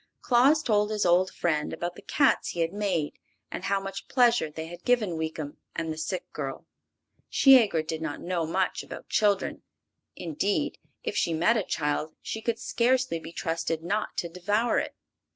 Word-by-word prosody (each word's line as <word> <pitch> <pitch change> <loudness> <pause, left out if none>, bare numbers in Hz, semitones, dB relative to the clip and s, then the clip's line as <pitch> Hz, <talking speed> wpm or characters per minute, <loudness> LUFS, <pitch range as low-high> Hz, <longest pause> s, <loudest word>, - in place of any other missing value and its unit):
Claus 270 +6 +4
told 210 -2 +2
his 210 -2 0
old 180 +2 +4
friend 155 -3 -1
about 175 0 -3
the - - -12
cats 275 -2 +2
he 170 - -2
had 165 +2 0
made, 195 -7 -1 0.3
and - - -5
how 200 0 +2
much 195 0 -6
pleasure 240 - +3
they 160 +1 -6
had 175 +1 -10
given 220 -8 +2
Weekum 160 -2 -4 0.2
and 160 -1 -2
the - - -10
sick 180 +4 -3
girl. 135 -3 -5 0.6
Shiegra 230 - +6
did 160 0 -4
not 155 -2 -3
know 175 -2 -2
much 185 +3 0
about - - -10
children; 205 -2 +1 0.5
indeed, 200 - -1 0.2
if - - -3
she 165 - +1
met 175 +9 +3
a 220 - +2
child 150 -2 -2
she 220 - -4
could 230 0 -1
scarcely 250 -7 +1
be 165 - -9
trusted 165 -1 -2
not 205 +5 -2
to 170 - -1
devour 205 +7 +1
it. - - -4
180 Hz, 175 wpm, -27 LUFS, 160-220 Hz, 0.6 s, Shiegra